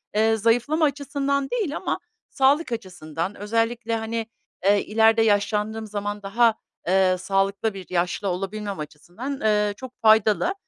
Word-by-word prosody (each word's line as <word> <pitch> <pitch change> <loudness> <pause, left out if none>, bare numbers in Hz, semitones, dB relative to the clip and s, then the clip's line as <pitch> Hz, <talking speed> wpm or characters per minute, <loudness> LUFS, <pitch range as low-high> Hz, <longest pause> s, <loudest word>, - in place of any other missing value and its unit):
eee, 220 +1 +3
zayıflama 245 +9 +2
açısından 280 -1 -1
değil 405 -12 -1
ama - - -2 0.3
sağlık 275 +1 +2
açısından 180 -4 -4
özellikle, 230 +2 -1
hani, 225 0 -3 0.4
eee, 200 0 +4
ileride 225 +1 +4
yaşlandığım 215 +1 +1
zaman 205 0 -4
daha, 225 +3 +3 0.3
eee, 185 0 +3
sağlıklı 195 +3 0
bir 190 -2 -8
yaşlı 180 +3 -1
olabilmem 195 +1 -4
açısından, 175 - -7
eee, 210 -1 +2
çok 260 -1 -11
faydalı. 220 - +4
220 Hz, 130 wpm, -24 LUFS, 195-235 Hz, 0.4 s, eee